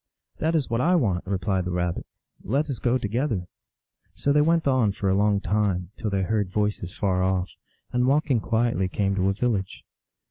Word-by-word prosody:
"That 160 +1 +1
is 150 -5 +1
what 115 +1 0
I 180 +5 +3
want," 100 - 0
replied 95 0 0
the - - -2
Rabbit. 90 -1 -2 0.4
"Let 140 +7 0
us 130 - -5
go 125 +1 +2
together." 115 -3 -1 0.7
So 140 - +1
they 150 - +5
went 165 0 +2
on 125 -7 +3
for 100 -1 -1
a - - +2
long 100 0 +3
time, 95 -2 0
till 110 - -3
they 100 -1 0
heard 105 0 0
voices 105 -2 -2
far 95 -3 +1
off, 95 0 0 0.4
and 125 +1 +1
walking 140 -2 +2
quietly 115 -3 0
came 100 +1 0
to 95 0 +1
a - - +1
village. 100 -3 -2
105 Hz, 190 wpm, -25 LUFS, 95-125 Hz, 0.7 s, they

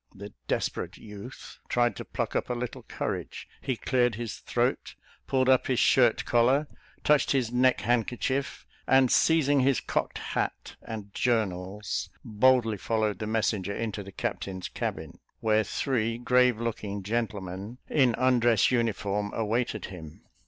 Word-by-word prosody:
The 100 +1 -9
"desperate - - -2
youth" 105 +4 -10
tried 120 0 +2
to - - -6
pluck - - -3
up - - -1
a 125 - -1
little 120 0 -5
courage - - -5
he 130 - -1
cleared 125 0 +1
his 115 -1 -5
throat, - - -1 0.3
pulled 130 -1 +2
up 130 -1 +4
his 130 - +1
shirt 120 -4 +4
collar, 125 +5 +3 0.4
touched 150 -1 +3
his 125 -4 0
neck 125 +1 +3
handkerchief, 125 +3 -1 0.2
and 130 -1 +5
seizing 145 -3 +4
his 135 -1 +3
cocked - - -2
hat - - -3
and 105 -3 -8
journals, 105 -4 -1 0.2
boldly 115 0 +3
followed 110 0 -1
the 110 - -3
messenger 105 -3 0
into 110 -2 -3
the 100 0 -10
captain's 95 0 -4
cabin, - - -5 0.2
where 110 -1 +2
three 115 -2 -1
grave 125 -1 +3
looking 105 -4 -3
gentlemen, 100 -1 -3
in 130 -6 +3
undress 120 -4 +3
uniform, 105 -4 0
awaited 115 +2 -1
him. 80 -3 -11
115 Hz, 140 wpm, -28 LUFS, 105-125 Hz, 0.4 s, and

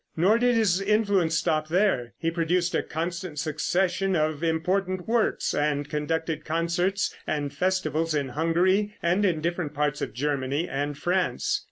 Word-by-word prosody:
Nor 200 +8 +4
did 245 0 +3
his 200 -5 +2
influence 200 -5 +2
stop 155 0 0
here. 160 - +1
He 165 0 -1
produced 170 +1 0
a - - +2
constant 170 0 -4
succession 180 +5 0
of 155 -1 0
important 180 +3 0
works, 230 0 +1
and 145 -1 0
conducted 155 +1 -2
concerts 170 +4 0
and 145 -2 -2
festivals 165 -4 0
in 140 -3 -1
Hungary, 180 +8 +1
and 175 +4 +2
in 170 -6 +1
different 170 -3 -2
parts 150 0 0
of - - -4
Germany 140 +3 -1
and 145 +1 -3
France. 175 -5 0
165 Hz, 150 wpm, -26 LUFS, 150-185 Hz, -, Nor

